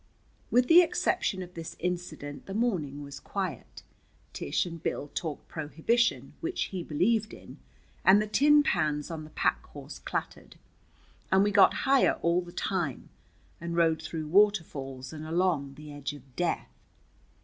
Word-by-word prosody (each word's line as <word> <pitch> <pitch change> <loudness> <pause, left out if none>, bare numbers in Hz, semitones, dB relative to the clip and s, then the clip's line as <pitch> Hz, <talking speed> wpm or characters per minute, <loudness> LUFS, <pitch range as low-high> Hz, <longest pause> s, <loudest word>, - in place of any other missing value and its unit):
With 245 +1 +3
the 340 +2 +9
exception 195 - 0
of 180 0 -12
this 165 -2 -7
incident 165 -5 -4
the 195 - -5
morning 165 - -1
was 140 -1 -8
quiet. 190 -7 -5 0.5
Tish - - -1
and 170 -2 -7
Bill 145 - -3
talked 160 -5 -4
prohibition, 165 - 0
which 345 +2 -1
he 185 -2 -4
believed 205 +8 0
in, - - -13 0.4
and 195 +2 +7
the 210 - 0
tin 295 +7 +5
pans 150 - 0
on 155 -2 -5
the - - -12
pack - - 0
horse - - -10
clattered, - - -5 0.8
and 190 +1 +5
we 205 - +2
got 200 -1 +6
higher 270 -1 +5
all 170 +1 +3
the 175 -1 -10
time, 175 -8 -2 0.5
and 170 0 -4
rode 160 -2 +3
through 160 0 -5
waterfalls 155 -9 +1
and 155 -1 -7
along 160 -4 0
the 150 0 -10
edge 145 0 -4
of 135 -3 -15
death. 175 +3 -2
170 Hz, 155 wpm, -29 LUFS, 150-200 Hz, 0.8 s, the